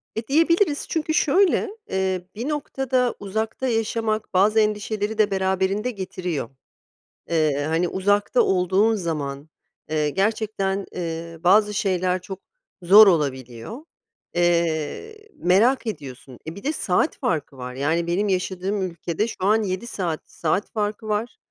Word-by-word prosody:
E, 220 Hz, +1 st, -4 dB
diyebiliriz 325 Hz, +2 st, +2 dB
çünkü 315 Hz, -1 st, -1 dB
şöyle, 380 Hz, +7 st, +3 dB, 0.2 s
eee, 190 Hz, -1 st, -1 dB
bir 245 Hz, +7 st, -3 dB
noktada 265 Hz, -4 st, -1 dB
uzakta 220 Hz, +6 st, -3 dB
yaşamak, 225 Hz, -2 st, -1 dB
bazı 210 Hz, +4 st, +4 dB
endişeleri 210 Hz, 0 st, -1 dB
de 210 Hz, -2 st, +3 dB
beraberinde 190 Hz, +4 st, 0 dB
getiriyor. 180 Hz, -, -4 dB, 0.8 s
Iıı, 150 Hz, -3 st, +1 dB
hani 165 Hz, +2 st, +1 dB
uzakta 205 Hz, +5 st, +1 dB
olduğun 190 Hz, +4 st, +2 dB
zaman, 150 Hz, -6 st, -4 dB, 0.4 s
ııı, 150 Hz, -1 st, +1 dB
gerçekten, 195 Hz, +1 st, -1 dB
ııı, 165 Hz, -1 st, -5 dB
bazı 210 Hz, +3 st, +5 dB
şeyler 185 Hz, -2 st, 0 dB
çok 190 Hz, +1 st, -8 dB, 0.4 s
zor 205 Hz, +5 st, +9 dB
olabiliyor. 135 Hz, -, -1 dB, 0.6 s
Eee, 175 Hz, -, -1 dB
merak 225 Hz, +9 st, +3 dB
ediyorsun. 130 Hz, -, -7 dB
E, 160 Hz, -, -5 dB
bir 200 Hz, -, -10 dB
de 300 Hz, -, +1 dB
saat 180 Hz, -, 0 dB
farkı 150 Hz, -4 st, -2 dB
var. 125 Hz, 0 st, -7 dB
Yani 160 Hz, +5 st, 0 dB
benim 195 Hz, +5 st, 0 dB
yaşadığım 190 Hz, +1 st, -1 dB
ülkede 170 Hz, +3 st, -2 dB
şu -, -, -7 dB
an 215 Hz, +2 st, +3 dB
7 190 Hz, +3 st, -3 dB
saat, 175 Hz, -8 st, -3 dB
saat 170 Hz, +5 st, -1 dB
farkı 215 Hz, 0 st, -3 dB
var, 215 Hz, +3 st, -2 dB
190 Hz, 130 wpm, -23 LUFS, 170-220 Hz, 0.8 s, zor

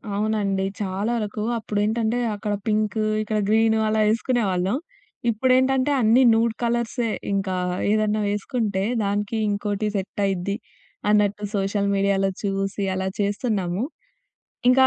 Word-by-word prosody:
అవునండి. 205 Hz, -2 st, 0 dB, 0.2 s
చాలా 200 Hz, +3 st, -1 dB
వరకు 210 Hz, -1 st, -3 dB
అప్పుడేంటంటే 220 Hz, +2 st, 0 dB, 0.2 s
అక్కడ 205 Hz, +1 st, -3 dB
పింకూ, 215 Hz, 0 st, +1 dB, 0.2 s
ఇక్కడ 215 Hz, 0 st, -1 dB
గ్రీను 220 Hz, 0 st, +4 dB
అలా 215 Hz, 0 st, +1 dB
ఏసుకునేవాళ్ళం. 215 Hz, -4 st, 0 dB, 0.5 s
ఇప్పుడేంటంటే 260 Hz, +4 st, +3 dB
అన్నీ 230 Hz, +4 st, +5 dB
నూడ్ 225 Hz, 0 st, +2 dB
కలర్సే. 235 Hz, 0 st, 0 dB, 0.2 s
ఇంకా 195 Hz, -1 st, -1 dB, 0.4 s
ఏదన్నా 215 Hz, 0 st, +1 dB
వేసుకుంటే 205 Hz, -1 st, -1 dB, 0.2 s
దానికి 205 Hz, +2 st, -1 dB
ఇంకోటి 205 Hz, +1 st, -1 dB
సెట్ 195 Hz, +1 st, -3 dB
అయిద్ది 195 Hz, +1 st, -1 dB, 0.5 s
అన్నట్టు 210 Hz, 0 st, +2 dB
సోషల్ 200 Hz, +1 st, 0 dB
మీడియాలో 195 Hz, 0 st, +2 dB
చూసి 195 Hz, 0 st, -1 dB
అలా 190 Hz, 0 st, -1 dB
చేస్తున్నాము. 205 Hz, -2 st, -1 dB, 0.9 s
ఇంకా 260 Hz, +1 st, +6 dB
210 Hz, 115 wpm, -23 LUFS, 200-225 Hz, 0.9 s, ఇంకా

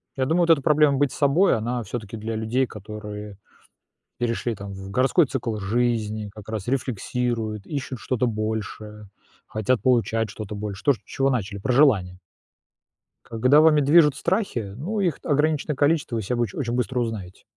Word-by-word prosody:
Я 130 Hz, -, 0 dB
думаю, 165 Hz, +6 st, +2 dB
вот -, -, -6 dB
эта 160 Hz, -4 st, +5 dB
проблема 150 Hz, -1 st, +4 dB
быть 145 Hz, -1 st, +2 dB
собой, 150 Hz, +7 st, +3 dB
она 120 Hz, +2 st, -2 dB
всё-таки 110 Hz, -1 st, -6 dB
для 110 Hz, +1 st, -4 dB
людей, 110 Hz, +4 st, 0 dB
которые 105 Hz, -1 st, -8 dB, 0.8 s
перешли 120 Hz, -1 st, -1 dB
там 100 Hz, -1 st, -8 dB
в 95 Hz, 0 st, -8 dB
городской 130 Hz, -, +3 dB
цикл 120 Hz, -4 st, -3 dB
жизни, 110 Hz, 0 st, -1 dB
как 105 Hz, 0 st, -10 dB
раз 110 Hz, -2 st, -4 dB
рефлексируют, 120 Hz, -4 st, -2 dB
ищут 140 Hz, -4 st, -4 dB
что-то 125 Hz, +2 st, -1 dB
большее, 110 Hz, -1 st, -4 dB, 0.4 s
хотят 110 Hz, +3 st, 0 dB
получать 115 Hz, -3 st, +1 dB
что-то 105 Hz, +1 st, -7 dB
больше. 100 Hz, -1 st, -6 dB
То, 140 Hz, -, +6 dB
с 125 Hz, -, -8 dB
чего 135 Hz, 0 st, 0 dB
начали- 100 Hz, -6 st, -2 dB
про 125 Hz, -, 0 dB
желания. 100 Hz, -10 st, +3 dB, 1.1 s
Когда 130 Hz, +6 st, +4 dB
вами 155 Hz, -1 st, +5 dB
движут 150 Hz, 0 st, +5 dB
страхи, 140 Hz, -, -1 dB
ну, 185 Hz, -, -3 dB
их 180 Hz, -6 st, 0 dB
ограниченное 150 Hz, +1 st, +1 dB
количество, 145 Hz, -4 st, +1 dB
вы 115 Hz, -, -1 dB
все 115 Hz, +5 st, -2 dB
оч 120 Hz, -5 st, -1 dB
очень 120 Hz, -4 st, -3 dB
быстро 125 Hz, +1 st, -1 dB
узнаете. 105 Hz, -6 st, -4 dB
120 Hz, 165 wpm, -24 LUFS, 105-140 Hz, 1.1 s, То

